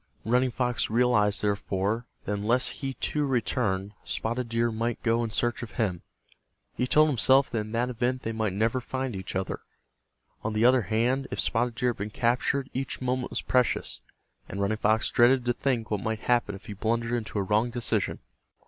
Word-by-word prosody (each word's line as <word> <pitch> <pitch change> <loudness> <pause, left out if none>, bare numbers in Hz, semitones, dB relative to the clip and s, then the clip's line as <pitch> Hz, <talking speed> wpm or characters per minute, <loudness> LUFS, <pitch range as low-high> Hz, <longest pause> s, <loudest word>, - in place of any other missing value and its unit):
Running 125 +3 +3
Fox 125 0 -1
realized, 110 -3 +3
therefore, 100 +2 -1 0.2
that 105 - -1
unless 115 +5 +2
he, 135 -2 -3
too, 150 - -1
returned, 105 -6 0
Spotted 120 +1 -2
Deer 115 0 +1
might 115 +1 -2
go 115 0 +2
in 115 - -2
search 120 +2 -1
of 120 - -7
him. 95 -8 -1 0.7
He 125 - -1
told 155 +4 +5
himself 135 +1 +4
that 115 - 0
in 105 0 -5
that 120 +2 0
event 125 +2 -1
they 115 - -2
might 110 -3 -1
never 115 +5 +1
find 130 -2 -3
each 95 0 -6
other. 95 0 -2 0.8
On 110 - -2
the 110 +2 +2
other 125 0 +6
hand 120 +7 0
if - - -4
Spotted 120 -1 0
Deer 125 +3 +1
had - - -9
been 105 +2 -4
captured 125 +4 0
each 135 +1 -3
moment 130 0 -1
was - - -3
precious, 125 -1 +1 0.5
and 100 - -5
Running 100 +2 0
Fox 110 +1 +2
dreaded 125 +1 +4
to 120 - +2
think 120 -4 -1
what 105 -2 0
might 110 -1 -2
happen 120 -4 +1
if 95 - -12
he 105 - -6
blundered 115 +3 -1
into 115 -3 -2
a 100 - +1
wrong 105 +5 +2
decision. 120 -1 -1
115 Hz, 195 wpm, -27 LUFS, 110-125 Hz, 0.8 s, other